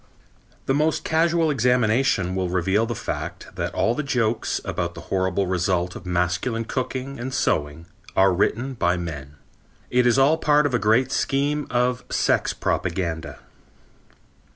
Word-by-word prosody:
The 135 - +1
most 155 +2 +1
casual 165 0 +2
examination 120 -6 +2
will 95 -1 -1
reveal 95 +5 +1
the 120 - -3
fact - - -5
that - - -3
all 115 - +2
the 150 - -2
jokes 120 -5 0
about 85 0 -3
the - - -8
horrible 95 0 +1
results 90 0 0
of 90 - -9
masculine 90 +7 -1
cooking 130 +1 -4
and 130 +2 -4
sewing 80 - -1 0.3
are 95 0 +5
written 120 +8 0
by 90 -7 +1
men. 75 -5 -6 0.6
It 125 0 +3
is 120 - +3
all 140 +4 +4
part 150 -1 +3
of 145 - 0
a 120 - +2
great 115 +5 +2
scheme 145 +2 0
of 125 0 0
sex - - +1
propaganda. 85 -2 -3
115 Hz, 150 wpm, -23 LUFS, 90-135 Hz, 0.6 s, are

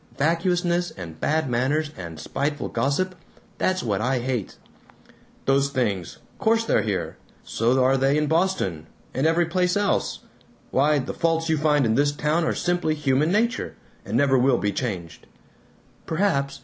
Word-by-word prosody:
Vacuousness 175 +3 +1
and 80 -4 -8
bad 155 -1 +1
manners 140 +5 0
and 85 - -8
spiteful 145 - -2
gossip 140 +10 0 0.5
that's 185 0 +1
what 105 -3 -1
I 130 +3 +1
hate." 125 -4 -3 0.9
"Those 140 +1 +3
things 105 - -2 0.2
course 225 +1 +2
they're - - +2
here. 105 -4 -3 0.3
So 125 +3 +1
are 135 +1 +3
they 135 +2 +2
in 150 - +2
Boston! 160 - 0 0.3
And 135 +4 +1
every 170 +2 +3
place 180 +2 +1
else! 205 -1 0 0.5
Why, 150 +3 +3
the 130 - -3
faults 165 0 0
you 160 - +2
find 150 -3 +3
in 110 - +2
this 145 +4 +3
town 150 +3 0
are - - 0
simply 175 -3 0
human 145 +2 +1
nature, 230 +4 0 0.3
and - - -2
never 135 -2 +4
will 125 0 +3
be 105 - 0
changed." 90 -8 -5 0.8
"Perhaps. 140 -6 0
145 Hz, 155 wpm, -24 LUFS, 125-165 Hz, 0.9 s, never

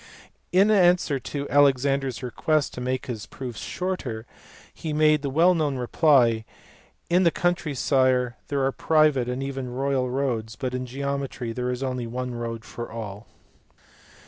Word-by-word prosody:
In 195 +4 +5
answer 175 -7 +4
to 140 +2 -5
Alexander 140 -1 +3
s 130 0 -6
request 150 +4 0
to 125 - -6
make 130 +1 -2
his 115 -6 -6
proofs 125 -5 -7
shorter, 145 -12 -4 0.5
he 155 -2 -5
made 155 -1 +4
the 140 - -2
well 165 +6 +4
known 150 -5 0
reply, 125 -3 +3 0.3
" - - -33
In 180 +2 +5
the 175 - +5
country, 170 -3 -1
sire, 130 -2 +2
there 140 -2 0
are 135 - +1
private 150 -5 +2
and 125 +2 -3
even 135 -2 -4
royal 130 0 0
roads, 120 -4 -2
but 125 +2 -4
in 125 0 -3
geometry 135 -2 -3
there 125 +1 -2
is 125 +1 -3
only 125 -2 -2
one 125 +1 -4
road 115 -1 -5
for 120 -1 -7
all." 105 -2 -7
135 Hz, 165 wpm, -25 LUFS, 125-145 Hz, 0.5 s, In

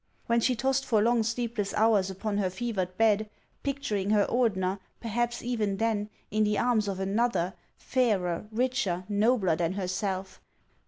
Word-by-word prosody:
When 235 0 +2
she 250 +2 +2
tossed 265 +3 +1
for 230 -5 +2
long 235 +2 +3
sleepless 230 -2 -2
hours 215 -3 +3
upon 200 +2 -2
her 190 -2 +1
fevered 185 -3 -3
bed, 215 -1 +3 0.3
picturing 265 -9 -2
her 210 -1 +4
Ordener, 195 -6 +1 0.2
perhaps 240 +1 -2
even 220 -5 -1
then, 215 -2 0 0.2
in 215 +1 +2
the 210 -1 +1
arms 235 -4 +2
of 195 -1 -3
another, 195 -2 0 0.2
fairer, 210 -8 0
richer, 230 -6 0
nobler 205 -3 +2
than 170 +2 -1
herself 190 0 -3
215 Hz, 150 wpm, -28 LUFS, 195-235 Hz, 0.3 s, her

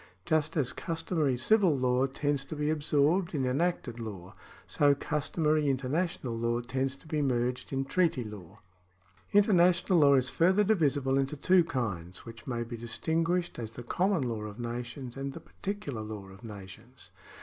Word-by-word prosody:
Just 155 +1 +1
as 135 -5 0
customary 160 -5 -1
civil 190 - +4
law 125 +1 +2
tends 145 +1 -1
to 155 - -6
be 150 +1 0
absorbed 155 +4 +1
in 135 -3 0
enacted 130 -3 -1
law, 100 -5 -7 0.3
so 145 -1 +3
customary 150 +1 0
international 135 -1 -1
law 115 +1 0
tends 130 +2 -2
to - - -20
be 155 -1 -1
merged 125 -2 -1
in 135 0 -1
treaty 165 -4 +1
law. 105 -6 -10 0.7
International 185 -3 +4
law 140 -2 +6
is 130 -1 +2
further 185 +10 +3
divisible 145 -9 +2
into 135 +2 -1
two 180 +5 +4
kinds, 100 - -4
which 115 +2 -11
may 120 -2 -2
be 120 0 -7
distinguished 165 +10 -1
as 115 -2 -4
the 120 +2 -9
common 180 - +1
law 115 -3 -2
of 105 +1 -7
nations 120 +2 -5
and 135 0 -4
the - - -8
particular 190 - -5
law 105 -3 -7
of 95 +4 -14
nations. 110 +4 -10
135 Hz, 160 wpm, -30 LUFS, 120-160 Hz, 0.7 s, law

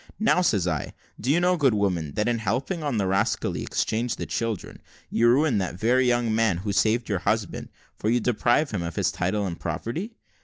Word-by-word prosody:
`Now,' 215 -4 +3
says 100 - +2
I, 80 -5 -2 0.3
`do 120 - -5
you 155 +5 +4
know, 180 +1 +2
good 135 -7 +3
woman, 90 -8 -1
that 105 - 0
in 120 -1 +1
helping 125 - -2
on 145 -6 -1
the 100 - +1
rascally 95 +1 0
exchange 115 +2 -1
of - - -4
children, 115 -4 -3 0.3
you 120 - +3
ruin 130 -2 +3
that 90 -2 -3
very 125 +4 +3
young 120 -2 +1
man 110 -5 +2
who 100 +3 -3
saved 115 +4 +2
your 100 -4 -1
husband, 105 +1 -2 0.3
for 105 - 0
you 120 +2 +3
deprive 120 +5 +1
him 100 -5 -2
of 85 -1 -5
his 95 -3 +1
title 100 +3 -1
and 85 -3 -5
property?' 120 - -4
110 Hz, 205 wpm, -25 LUFS, 95-125 Hz, 0.3 s, you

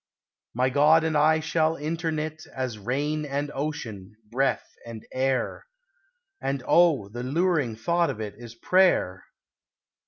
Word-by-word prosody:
My 130 +1 +1
God 150 +4 +5
and 160 -1 0
I 155 +2 +4
shall 160 0 +1
interknit 155 0 -3
As 130 -5 -5
rain 145 +8 -1
and 145 0 -3
Ocean, 115 -9 -5 0.2
breath 135 +3 0
and 115 -2 -9
Air; 130 - -1 0.7
And 135 -1 -2
oh, 165 - +4
the 120 +3 -6
luring 145 -2 0
thought 170 +8 +1
of 125 -5 -5
it 105 -2 -5
Is 120 +1 -11
prayer! 150 - +2
140 Hz, 130 wpm, -26 LUFS, 120-160 Hz, 0.7 s, God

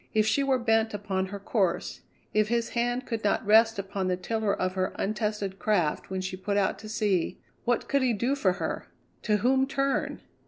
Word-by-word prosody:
If 215 -1 +4
she 220 +6 +2
were 270 -1 +2
bent 225 -2 +1
upon 190 -2 -2
her 200 +1 -6
course, 190 -3 -1 0.3
if 215 0 +3
his 235 0 0
hand 245 +1 -1
could 225 -2 -3
not 205 - +1
rest 225 +1 +5
upon 195 -1 -3
the 180 -1 0
tiller 215 +3 -1
of 185 -1 -1
her 185 0 -1
untested 210 -2 -2
craft 180 -8 0
when 190 0 -2
she 185 0 -4
put 200 +2 -2
out 195 -2 +1
to 215 - -9
sea, 205 -6 0 0.3
what 245 -1 +1
could 280 - +2
he 255 -2 +3
do 240 +6 0
for 195 -10 +2
her? - - -4 0.3
To 210 -2 +2
whom 265 +4 +2
turn? 275 0 -1
210 Hz, 200 wpm, -28 LUFS, 190-235 Hz, 0.3 s, rest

